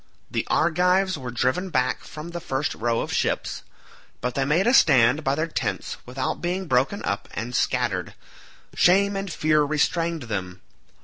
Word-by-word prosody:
The - - -2
Argives 180 +3 +2
were 130 -4 -6
driven 130 +10 0
back 130 -5 0
from 155 +3 -9
the 175 - -4
first 145 -3 -2
row 115 0 -1
of - - -4
ships, - - -1 0.6
but 125 0 -2
they 135 +1 0
made 165 +7 +2
a 240 - +3
stand 130 - +5
by 135 0 +1
their 155 +2 0
tents 165 - -3
without 130 +1 -3
being 180 +2 -2
broken 135 +7 +1
up 100 0 -3
and 120 +3 -4
scattered; - - 0 0.6
shame 200 +3 +4
and 195 -1 -3
fear 155 -1 +2
restrained 160 +2 0
them. 95 -5 -5
150 Hz, 165 wpm, -24 LUFS, 125-175 Hz, 0.6 s, stand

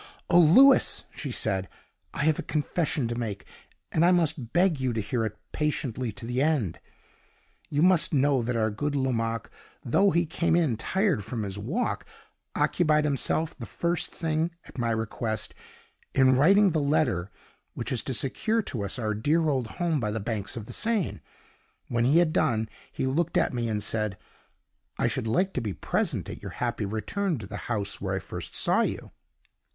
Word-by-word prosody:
"Oh, 175 - +7
Louis!" 255 - +6
she - - -5
said, 95 -1 0 0.4
"I - - -2
have 155 0 +2
a - - 0
confession 155 -2 -1
to 120 - -2
make, 110 -5 -4 0.5
and 160 - +2
I 175 - +6
must 160 -9 +1
beg 175 -4 +3
you 130 -2 0
to 110 - -1
hear 115 +3 -1
it 105 -1 -9
patiently 130 -6 -1
to 105 +3 -7
the 125 +2 -1
end. 140 - +1 0.9
You 145 +2 +1
must 180 -3 +4
know 140 -2 +3
that 120 +1 -2
our 110 -1 +1
good 145 +7 -2
Lomaque, 115 -4 -1 0.3
though 195 +12 +3
he 170 -1 +2
came 165 +1 +1
in 160 -9 +2
tired 185 - 0
from 110 +1 -4
his 100 0 -5
walk, 165 - -2 0.5
occupied 155 -3 +2
himself 150 +2 0
the - - -8
first 170 0 -1
thing, 160 0 -1 0.2
at - - -10
my 120 -1 0
request, 110 0 -2 0.6
in 130 -1 +5
writing 195 +8 +5
the 160 - +1
letter 125 - +1 0.5
which - - -4
is 125 - 0
to 130 - -1
secure 215 - +1
to 115 - -4
us 100 - -3
our 110 -3 -1
dear 155 +10 +1
old 130 -5 0
home 170 +2 -1
by 105 -4 -1
the 110 +2 -2
banks 110 0 -3
of 110 - -6
the - - -7
Seine. 220 -5 0 0.7
When 120 0 +1
he 140 +6 +4
had 170 -2 +3
done, 115 -8 +1 0.2
he - - -2
looked 155 +6 0
at - - +2
me, 120 -1 -1
and 105 -1 -1
said, 110 -2 -1 0.8
'I - - +1
should 115 - -2
like 185 +13 +1
to 130 - -1
be 105 -4 -3
present - - -1
at - - -8
your - - -7
happy 105 - -2
return 155 - -2
to 110 - -7
the 105 +1 -7
house 100 -5 -2
where 95 -1 -1
I - - -1
first 90 -2 -7
saw - - +3
you. - - -3
130 Hz, 190 wpm, -27 LUFS, 110-160 Hz, 0.9 s, Oh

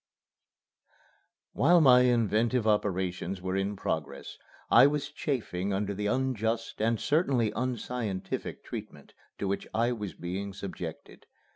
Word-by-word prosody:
XX - - -34 0.6
While 175 +5 +5
my 125 -4 +7
inventive 120 -1 +2
operations 95 -3 0
were 95 +1 -3
in 95 +1 -1
progress, - - -4 0.3
I 120 +4 +8
was 145 -1 -2
chafing 100 - -2
under 100 +1 -1
the 105 +1 -2
unjust 115 -3 -1
and 115 0 +1
certainly 135 -8 +2
unscientific 120 -5 -3
treatment - - -8 0.2
to 100 - -2
which 100 +1 -2
I 115 +2 +2
was 105 -8 -5
being 95 +3 -5
subjected. 100 0 -8
110 Hz, 125 wpm, -29 LUFS, 100-125 Hz, 0.6 s, I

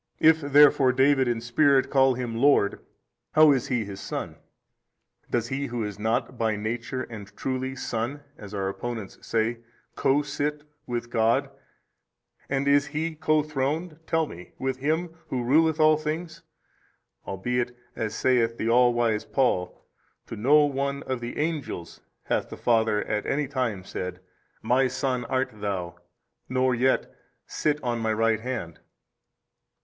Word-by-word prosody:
if 160 0 +5
therefore 145 -2 +6
David 135 0 +3
in 120 -1 0
spirit 135 +3 +3
25 - - -15
call 135 -1 +5
Him 120 -2 -4
Lord, 120 -5 +3 0.5
how 155 -1 +7
is 130 -3 +1
He 120 -4 0
his 100 -1 -8
Son? - - -5 0.9
does 115 -1 -1
he 140 +1 -2
who 120 -1 -3
is 105 -1 -5
not 115 +3 -1
by 110 -2 +1
Nature 115 +4 -3
and 110 -5 -9
truly 130 0 -2
Son 130 +3 -3
(as 105 -2 -11
our 100 -2 -2
opponents 110 +1 -5
say) 115 +1 -1 0.4
co 140 +2 +2
sit 145 +1 -3 0.2
with 120 0 -4
God, 115 0 +2 1.0
and 140 0 0
is 140 0 +4
he 160 +2 -2
co 155 0 +1
Throned 150 +3 -2
(tell 160 -1 +2
me) 90 - -11
with 130 -1 -2
Him 160 +6 0 0.2
Who 125 -2 -2
ruleth 160 +5 +3
all 155 0 +6
things? 160 +2 -4 0.9
albeit, 120 +5 -2 0.2
as 110 -2 -3
saith 115 -3 +2
the 110 - -2
all 120 0 +5
wise 115 -3 +1
Paul, 105 -9 -1 0.4
to - - -7
no 145 +8 +5
one 140 0 -2
of 130 -2 -3
the 120 0 -6
angels 150 - -3 0.2
hath - - -1
the - - -8
Father 110 -3 +2
at 105 0 -2
any 140 +1 0
time 125 -8 -2
said, 90 0 -5 0.4
My 130 +2 +3
Son 130 -1 -2
art 130 +2 -1
THOU, 100 -5 -3 0.6
nor 130 0 +2
yet, 130 +2 +1 0.3
Sit 150 -1 -1
on 120 -1 -1
My 110 -1 0
Right 115 0 +2
Hand. 110 -9 -5
125 Hz, 155 wpm, -26 LUFS, 115-145 Hz, 1.0 s, how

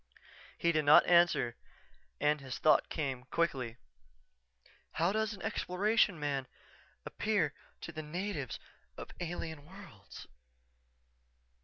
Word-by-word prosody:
_" - - -45 0.5
He 170 - +2
did 155 -2 +1
not 145 +1 +7
answer 170 -9 +4 0.6
and 150 0 +2
its 130 -3 -6
thought 155 - +4
came, 135 -5 -3
quickly, 130 -6 -1 1.2
"_How 170 +4 +2
does 220 -1 0
an 195 - -12
Exploration 200 0 +1
man 140 -3 -2 0.6
appear 190 -9 0 0.3
to - - -6
the 155 -1 -6
natives 160 - -4 0.4
of - - -8
alien 165 -3 -5
worlds? 160 - -12
160 Hz, 115 wpm, -33 LUFS, 140-180 Hz, 1.2 s, not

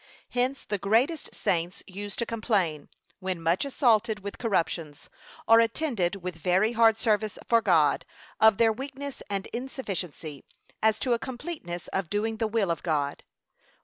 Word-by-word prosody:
Hence 250 +2 0
the 205 -1 -3
greatest 240 - +1
saints 175 +1 -1
use 205 +1 -6
to 235 - -1
complain, 200 -10 -1 0.3
when 185 -2 -3
much 165 +8 +1
assaulted 225 -6 +2
with 200 +1 -7
corruptions, 165 -8 -2 0.4
or 225 0 +8
attended 230 - +1
with 180 -2 -4
very 185 +6 +2
hard 225 -1 +5
service 215 -2 0
for 230 -1 +4
God, 160 -8 +3 0.4
of 220 -2 +6
their 225 -1 +4
weakness 275 +3 -7
and 195 -1 -2
insufficiency, 190 - -5 0.4
as 220 0 +3
to 245 +2 +1
a 235 - +1
completeness 240 - -6
of 190 -4 -2
doing 220 +2 -1
the 225 0 0
will 215 -5 +1
of 165 - -2
God. 145 -4 -1
215 Hz, 150 wpm, -27 LUFS, 180-230 Hz, 0.4 s, or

